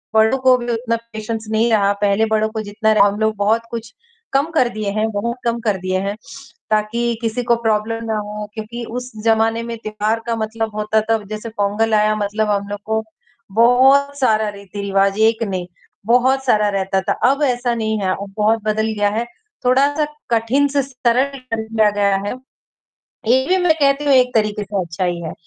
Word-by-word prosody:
बड़ों 220 +4 +4
को 255 -1 +5
भी 240 0 -3
उतना 230 0 -1 0.2
पेशेंस 220 +1 -4
नहीं 225 +2 +2
रहा। 200 -2 +3
पहले 205 +2 +3
बड़ों 220 0 +2
को 220 0 -4
जितना 215 +1 0
हम 205 +1 +1
लोग 220 0 +1
बहुत 215 +3 +2
कुछ 225 -1 -6 0.4
कम 280 +4 +2
कर 255 -7 +2
दिए 215 -2 -3
हैं 215 +2 0
बहुत 235 +4 -2
कम 235 0 0
कर 210 -4 0
दिए 185 +1 -1
हैं 200 +1 -3 0.5
ताकि 215 +2 0 0.2
किसी 230 +2 -2
को 235 0 +3
प्रॉब्लम 225 +1 0
ना 220 -1 -1
हो 210 0 -5
क्योंकि 230 +2 -6 0.2
उस 250 +1 -9
ज़माने 225 +1 +2
में 235 0 -5
त्योहार 215 +1 -2
का 230 - 0
मतलब 220 0 -3
होता 215 +1 +1
था, 225 +1 +1
जैसे 215 +3 -6
पोंगल 215 +1 0
आया 215 0 +3
मतलब 210 +1 -1
हम 200 0 -1
लोगों 215 +2 -2
को, - - -15 0.5
बहुत 270 +4 +4
सारा 220 -4 +2
रीति-रिवाज, 200 0 -1
1 225 +1 +3
नहीं 185 -4 -3 0.4
बहुत 260 +3 +3
सारा 210 -4 +3
रहता 195 -1 0
था, 185 - -2 0.2
अब 280 - -2
ऐसा 245 -2 +1
नहीं 220 -1 -1
है, 190 -1 -1
अब 195 +1 -5
बहुत 220 +1 +2
बदल 215 +1 0
गया 205 0 +3
है। 225 +3 -2 0.4
थोड़ा-सा 285 +4 +3 0.3
कठिन 235 +5 +2
से 280 0 +1
सरल 260 +1 0
कर 230 -3 -4
लिया 220 -1 +2
गया 200 -1 +1
है, - - -2 0.9
ये 260 +2 +4
भी 370 +2 +3
मैं 355 -3 +3
कहती 280 0 +2
हूँ 280 - +4
एक 255 -1 +4
तरीके 210 -1 +1
से 200 -1 -2
अच्छा 170 +2 -4
ही 175 -1 -2
है। 160 - -5
220 Hz, 195 wpm, -19 LUFS, 210-240 Hz, 0.9 s, को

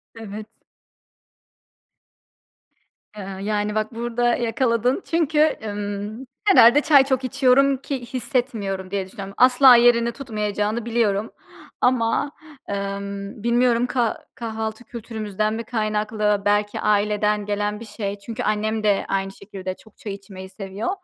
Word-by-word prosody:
Evet. 215 -1 -7 2.7
Eee, 195 -1 -7
yani, 210 0 -1
bak 215 +1 -2
burada 240 +1 0
yakaladın 240 - 0
çünkü, 315 -2 +2
ımm, 205 +4 -5 0.2
herhâlde 285 - +7
çay 290 -4 +6
çok 265 -1 0
içiyorum 270 +1 +3
ki 265 -2 -5
hissetmiyorum 215 -8 -2
diye 195 -2 -1
düşünüyorum. 195 0 -8
Asla 255 0 +7
yerini 235 0 +4
tutmayacağını 215 -3 -2
biliyorum 225 -3 0 0.5
ama, 250 +3 +2 0.4
emm, 200 +2 -5
bilmiyorum 240 0 +2
kah 240 -3 0 0.2
kahvaltı 220 0 -5
kültürümüzden 215 -3 -3
mi 230 +1 -4
kaynaklı 215 -2 0
belki 205 0 +1
aileden 210 0 +1
gelen 210 0 -2
bir 230 - -9
şey 205 -1 -5
çünkü 230 +4 -6
annem 215 +1 -1
de 205 -2 +2
aynı 195 0 -1
şekilde 190 -2 -7
çok 220 +1 -21
çay 205 -3 -6
içmeyi 190 -1 -10
seviyor. 195 - -5
215 Hz, 120 wpm, -22 LUFS, 205-240 Hz, 2.7 s, herhâlde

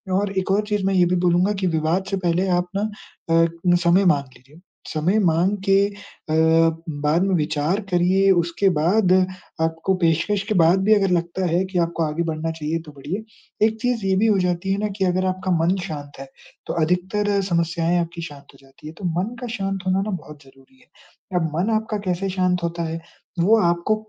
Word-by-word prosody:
और 200 +1 0
एक 190 - -2
और 200 +2 +3
चीज 210 -2 -1
मैं 195 - +1
ये 180 -1 +5
भी 180 +1 +1
बोलूँगा 175 +3 +3
कि 185 - +1
विवाद 165 +3 0
से 195 - 0
पहले 180 +1 0
आप 180 - -3
ना - - 0 0.5
अ, 165 - +5 0.4
समय 180 +3 +4
माँग 140 -6 +2
लीजिए। 140 +6 -20 0.3
समय 170 +7 0
माँग 180 +2 +2
के 195 +1 +5
अ, 205 - -10 1.0
बाद 150 +4 0
में 195 -2 +1
विचार 155 +5 0
करिए 185 +2 +3
उसके 175 +2 +2
बाद 185 +4 +2 0.5
आपको 165 +3 0
पेशकश 170 +5 +1
के - - +2
बाद 170 +1 +4
भी 215 +2 +5
अगर 195 -3 +1
लगता 175 +2 -1
है 175 +3 +2
कि 185 -1 -5
आपको 170 -1 0
आगे 155 +2 -1
बढ़ना 160 0 -3
चाहिए 160 0 -3
तो 150 - -11
बढ़िए। 165 +10 -5 0.4
एक 220 0 -4
चीज़ 245 -4 -1
ये 190 - +2
भी 220 +3 +3
हो 210 -3 +3
जाती 180 +1 -1
है - - -1
ना, 210 - 0
कि 195 -1 -2
अगर 185 +1 +1
आपका 185 0 -2
मन 180 +3 +2
शांत 145 -3 -8
है 135 - -8 0.4
तो - - -2
अधिकतर 195 +4 0
समस्याएंँ 170 0 +1
आपकी 170 0 -6
शांत 145 -4 -10
हो - - -18
जाती 135 +2 -15
हैं, 155 - -9
तो 195 - -6
मन 225 +6 -3
का 245 - -4
शांत 195 0 -2
होना 185 +1 +2
ना 210 - -3
बहुत 150 -5 -8
ज़रूरी 135 - -22
है। 255 - -25 0.5
अब 160 -2 -2
मन 180 +7 0
आपका 215 -1 -2
कैसे 185 +1 -1
शांत 185 -1 0
होता 170 0 -2
है, 165 0 -4 0.4
वो 205 +7 +5
आपको 175 +4 +1
180 Hz, 205 wpm, -22 LUFS, 165-195 Hz, 1.0 s, ये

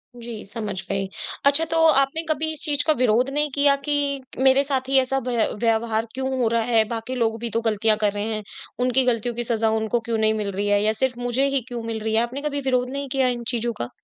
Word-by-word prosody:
जी, 235 -2 -7
समझ 210 0 -5
गई। 195 0 -1 0.4
अच्छा 285 +4 +4
तो 330 - +1
आपने 275 +2 +3
कभी 315 0 0
इस 310 - -7
चीज़ 290 -1 +1
का 310 - +5
विरोध 245 +2 +3
नहीं 295 +1 0
किया 280 0 +5
कि 285 -2 0 0.2
मेरे 265 +1 +5
साथ 265 -2 -2
ही 270 - +4
ऐसा 265 +1 0
व्य 235 -3 +1
व्यवहार 225 0 +1
क्यों 265 +1 -2
हो 235 - +3
रहा 230 0 +1
है, 225 -1 +3
बाकी 230 +2 -4
लोग 225 -2 0
भी 235 0 -3
तो 230 +1 -1
गलतियाँ 215 0 +2
कर 205 -1 +3
रहे 210 +2 -2
हैं, 215 - -5 0.4
उनकी 255 +1 +2
गलतियों 240 -1 0
की 240 - -2
सज़ा 225 -1 +1
उनको 220 +2 0
क्यों 225 - +1
नहीं 220 0 +2
मिल 210 -2 -2
रही 200 +2 -2
है 205 0 +3
या 215 - +3
सिर्फ़ 250 -2 0
मुझे 245 +3 +1
ही 275 -1 0
क्यों 240 -2 -5
मिल 225 -1 -3
रही 220 0 0
है? 225 - +4
आपने 255 +4 -5
कभी 285 -1 -2
विरोध 250 -1 0
नहीं 280 +1 -4
किया 265 -1 +2
इन 240 -1 -2
चीज़ों 235 0 -1
का? 120 - -3
240 Hz, 250 wpm, -23 LUFS, 225-270 Hz, 0.4 s, का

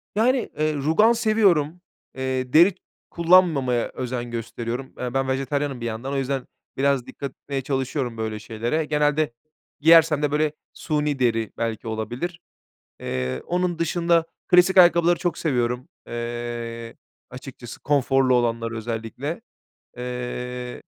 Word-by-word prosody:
Yani, 245 +3 +2
eee, 155 0 +2
rugan 160 +10 +3
seviyorum, 195 -8 +2 0.3
eee, 130 -1 -2
deri 175 +4 +6 0.3
kullanmamaya 165 -8 +3
özen 120 -1 -4
gösteriyorum. 120 +2 -5
Eee, 125 -1 -3
ben 135 0 0
vejetaryenim 135 0 -1
bir - - -3
yandan 120 +4 -4
o - - 0
yüzden 135 0 -2 0.3
biraz 140 -2 +2
dikkat 140 -2 -6
etmeye 140 0 -5
çalışıyorum 130 -2 -2
böyle 110 -1 -3
şeylere. 115 +8 -2
Genelde 150 -2 +1 0.5
giyersem 160 -1 +6
de 150 -1 +1
böyle 150 0 +1 0.2
suni 150 -3 -1
deri 115 -3 +1
belki 115 -1 -3
olabilir. 120 - -4 0.6
Eee, 65 0 -3
onun 175 -1 -1
dışında 170 0 +2 0.2
klasik 180 +2 +5
ayakkabıları 175 -1 +6
çok 175 -2 -1
seviyorum, 125 -4 -1 0.2
eee, 120 -1 -5 0.3
açıkçası 125 -2 -10
konforlu 135 -2 +2
olanları 115 -1 0
özellikle. 115 - -4 0.6
Eee, 125 0 -5
135 Hz, 125 wpm, -24 LUFS, 120-160 Hz, 0.6 s, deri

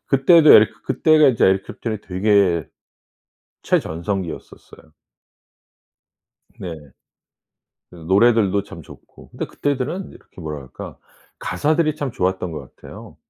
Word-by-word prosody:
그때도 155 +3 +5
에리 110 - +6 0.2
그때가 155 -1 +3
이제 120 -4 +2
Eric 95 0 +2
Clapton이 110 -3 -6
되게 95 -5 +1 0.9
최전성기였었어요. 85 -2 -4 1.7
네. 90 -3 -6 1.2
그 - - -15
노래들도 100 +3 +2
참 85 - -11
좋고 - - -17
근데 - - -6
그때들은 145 +7 -3
이렇게 - - -17
뭐라 75 -2 -6
할까. 65 - -11 0.4
가사들이 155 0 0
참 145 -3 -4
좋았던 90 -3 -2
것 70 -4 -10
같아요. - - -13
100 Hz, 300 characters per minute, -20 LUFS, 85-135 Hz, 1.7 s, 에리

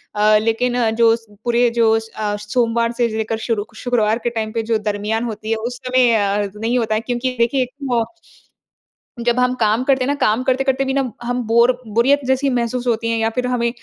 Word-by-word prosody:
अ, 210 0 +4
लेकिन 230 +3 0 0.2
जो 230 0 +4
स 230 -1 -13 0.2
पूरे 240 0 +2
जो 225 -1 +4
स 225 - -11
अ, 210 -1 -2
सोमवार 230 +2 0
से 240 - +2
लेकर 220 0 -2
शुरूक 220 -1 -2
शुक्रवार 225 -2 0
के 240 - +1
टाइम 220 -2 -3
पे 230 0 -1
जो 225 0 +1
दरमियान 210 +2 -2
होती 220 -1 -5
है, 225 - +3
उस 240 +3 -4
समय 250 -2 +4
अ, 205 -1 +1
नहीं 225 +4 -1
होता 220 -2 0
है 215 - 0
क्योंकि 245 +2 -2
देखिए, 250 +2 +2 0.2
म 235 -1 +2 1.2
जब 240 +1 +1
हम 250 0 +2
काम 220 +2 +2
करते 265 -1 +2
हैं - - -2
ना, 285 - +1
काम 225 0 +2
करते-करते 265 +1 +1
भी 265 - -1
ना 275 - +2 0.2
हम 245 +1 -2
बोर 235 +2 +4 0.2
बोरियत 265 +5 +4
जैसी 265 +1 +1
महसूस 245 0 -1
होती 230 -1 0
है 230 - 0
या 225 0 +1
फिर 250 +2 -2
हमें 245 -1 0
235 Hz, 215 wpm, -19 LUFS, 220-250 Hz, 1.2 s, अ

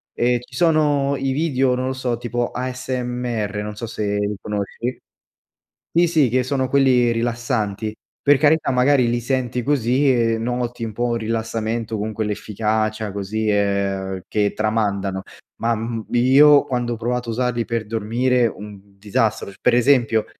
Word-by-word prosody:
ehm, 120 0 +2
ci 125 0 -14
sono 145 -4 +2
i 135 0 -1
video, 135 -3 +1
non 130 +1 -2
lo 130 - -1
so, 125 -2 -2
tipo 120 0 -2
ASMR 125 -4 -3
non 105 0 -6
so 115 +2 -6
se 105 -2 -2
li 105 0 -1
conosci. 105 +4 -4 1.0
Sì, 175 0 +5
sì 155 -6 +3
che 130 +1 +2
sono 130 0 -1
quelli 125 -3 +3
rilassanti, 115 -3 -2 0.3
per 145 -1 +5
carità 155 +1 +3
magari 125 0 +3
li 120 - 0
senti 125 0 -1
così 135 0 +2
e 115 -2 +1
noti 120 0 -3
un 110 - -5
po' 120 +2 -1
rilassamento, 115 0 -2
con 110 +1 -3
quell'efficacia 110 0 -2
così, 105 +2 -2
ehm, 100 -2 0
che 105 -1 +1
tramandano, 100 -3 -1 0.4
ma 115 0 +1
m 115 0 -4
io 140 +4 +6
quando 120 -2 -2
ho - - -6
provato 120 +1 -2
a - - -2
usarli 120 0 -1
per 115 -2 -3
dormire, 120 +3 +1
un 105 -2 -7 0.2
disastro 105 +1 -1
sc 100 - -16
per 125 - +3
esempio, 120 -3 +3
120 Hz, 155 wpm, -21 LUFS, 110-130 Hz, 1.0 s, io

